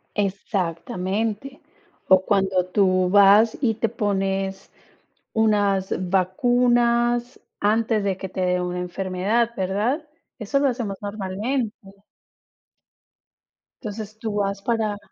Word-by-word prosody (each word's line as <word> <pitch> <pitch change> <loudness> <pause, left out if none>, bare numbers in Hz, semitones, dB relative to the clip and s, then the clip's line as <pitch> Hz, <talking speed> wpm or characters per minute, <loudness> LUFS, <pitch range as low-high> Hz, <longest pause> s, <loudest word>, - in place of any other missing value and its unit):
Exactamente. 200 - -2 0.5
O 185 0 +7
cuando 190 -3 +1
tú 185 -1 +2
vas 205 +3 +6
y 225 -5 +1
te 225 +1 -1
pones 195 -3 -2 0.6
unas 205 -3 +2 0.2
vacunas 240 +5 +2 0.2
antes 220 0 +1
de 195 -2 -1
que 190 - -6
te 185 - -4
dé 180 0 +1
una 180 0 -3
enfermedad, 190 +6 -1
¿verdad? 210 - -1 0.3
Eso 225 +5 0
lo 280 - +3
hacemos 230 -6 -3
normalmente. 210 +4 -2 2.1
Entonces, 215 -1 -7
tú 220 -2 -4
vas 200 -1 -1
para 215 -1 -1
205 Hz, 105 wpm, -23 LUFS, 190-230 Hz, 2.1 s, O